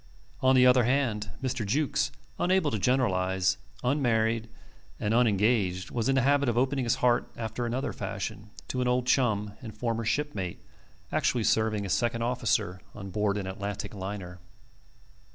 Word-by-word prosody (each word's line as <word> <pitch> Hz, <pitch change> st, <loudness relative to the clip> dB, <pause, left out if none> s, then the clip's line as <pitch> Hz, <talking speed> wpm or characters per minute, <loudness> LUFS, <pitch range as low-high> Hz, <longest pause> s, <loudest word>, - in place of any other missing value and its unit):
On 130 Hz, 0 st, +5 dB
the 125 Hz, 0 st, +6 dB
other 125 Hz, 0 st, +6 dB
hand, 120 Hz, -5 st, 0 dB
Mr. 130 Hz, -2 st, -1 dB
Jukes, 135 Hz, +9 st, 0 dB, 0.3 s
unable 180 Hz, -4 st, +2 dB
to 110 Hz, -, -1 dB
generalize, 95 Hz, -5 st, +1 dB, 0.3 s
unmarried, 115 Hz, -4 st, +1 dB, 0.5 s
and 105 Hz, +1 st, 0 dB
unengaged, 105 Hz, -5 st, +2 dB
was 115 Hz, +1 st, -1 dB
in 135 Hz, -, +3 dB
the 130 Hz, -, +3 dB
habit 140 Hz, -1 st, +3 dB
of 120 Hz, -, -1 dB
opening 130 Hz, +1 st, +1 dB
his 115 Hz, -, +2 dB
heart 120 Hz, -1 st, +3 dB
after 115 Hz, +1 st, -3 dB
another 125 Hz, +4 st, -2 dB
fashion 105 Hz, -, -5 dB, 0.2 s
to 125 Hz, -, -1 dB
an 125 Hz, -, +1 dB
old 125 Hz, 0 st, +1 dB
chum 105 Hz, -6 st, +1 dB
and 110 Hz, -4 st, -9 dB
former 115 Hz, 0 st, -1 dB
shipmate, 110 Hz, -8 st, -2 dB, 0.5 s
actually 120 Hz, -3 st, +1 dB
serving 110 Hz, -2 st, +1 dB
as 95 Hz, -, 0 dB
second 115 Hz, -1 st, 0 dB
officer 115 Hz, -7 st, 0 dB
on 100 Hz, -2 st, -7 dB
board 105 Hz, 0 st, 0 dB
an 100 Hz, -, -3 dB
Atlantic 100 Hz, +2 st, -5 dB
liner. 95 Hz, -2 st, -6 dB
115 Hz, 155 wpm, -28 LUFS, 100-125 Hz, 0.5 s, the